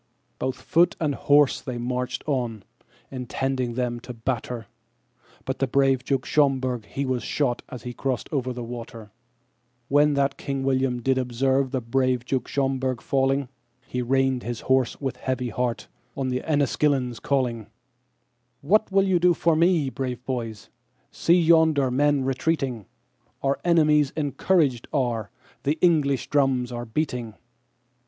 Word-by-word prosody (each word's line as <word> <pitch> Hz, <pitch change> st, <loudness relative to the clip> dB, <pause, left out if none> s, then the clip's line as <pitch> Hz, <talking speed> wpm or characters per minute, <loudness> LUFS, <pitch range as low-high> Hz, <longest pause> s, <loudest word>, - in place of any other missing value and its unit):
Both 130 Hz, 0 st, -1 dB
foot 170 Hz, +2 st, +3 dB
and 150 Hz, -3 st, 0 dB
horse 145 Hz, 0 st, +3 dB
they 125 Hz, -2 st, -5 dB
marched 125 Hz, +1 st, -3 dB
on, 120 Hz, -8 st, -2 dB, 0.5 s
intending 130 Hz, -1 st, -2 dB
them 120 Hz, -1 st, -1 dB
to 125 Hz, +1 st, -9 dB
batter, 115 Hz, 0 st, -3 dB, 0.8 s
But 130 Hz, -, -3 dB
the 135 Hz, -, +1 dB
brave 135 Hz, -1 st, +2 dB
Duke 135 Hz, -1 st, -1 dB
Schomberg 130 Hz, -5 st, +1 dB
he 140 Hz, -, -3 dB
was 130 Hz, -2 st, -1 dB
shot 130 Hz, -5 st, -1 dB
as 125 Hz, -3 st, -8 dB
he 125 Hz, -, -5 dB
crossed 130 Hz, -1 st, -2 dB
over 130 Hz, -4 st, -1 dB
the 125 Hz, -1 st, -5 dB
water. 115 Hz, -2 st, -8 dB, 0.8 s
When 145 Hz, +1 st, +4 dB
that 140 Hz, 0 st, 0 dB
King 135 Hz, -1 st, -3 dB
William 130 Hz, -2 st, 0 dB
did 130 Hz, +1 st, +2 dB
observe 130 Hz, +2 st, +1 dB
the 130 Hz, -1 st, -2 dB
brave 125 Hz, +1 st, 0 dB
Duke 130 Hz, -1 st, -1 dB
Schomberg 130 Hz, -2 st, -1 dB
falling, 135 Hz, +1 st, +1 dB, 0.4 s
He 125 Hz, -, -3 dB
reined 130 Hz, 0 st, +1 dB
his 120 Hz, 0 st, -5 dB
horse 130 Hz, -2 st, +1 dB
with 135 Hz, -3 st, -3 dB
a -, -, -23 dB
heavy 130 Hz, -1 st, -2 dB
heart, 120 Hz, +1 st, -2 dB, 0.3 s
on 135 Hz, -1 st, -1 dB
the 125 Hz, 0 st, -1 dB
Enniskillenes 140 Hz, -4 st, +1 dB
calling:"What 125 Hz, -, -3 dB
will 195 Hz, 0 st, +4 dB
you 185 Hz, -2 st, +3 dB
do 175 Hz, 0 st, +4 dB
for 165 Hz, -1 st, +2 dB
me, 165 Hz, -4 st, +3 dB
brave 125 Hz, 0 st, -4 dB
boys—see 125 Hz, -, -2 dB
yonder 160 Hz, -5 st, +4 dB
men 145 Hz, +1 st, +2 dB
retreating? 135 Hz, -4 st, -1 dB, 0.6 s
Our 135 Hz, 0 st, +1 dB
enemies 155 Hz, -4 st, +3 dB
encouraged 145 Hz, -3 st, +1 dB
are, 120 Hz, -7 st, -1 dB, 0.3 s
and 145 Hz, +3 st, +1 dB
English 145 Hz, -7 st, +2 dB
drums 135 Hz, -4 st, +2 dB
are 120 Hz, 0 st, -5 dB
beating." 120 Hz, -3 st, -3 dB
130 Hz, 145 wpm, -25 LUFS, 125-140 Hz, 0.8 s, When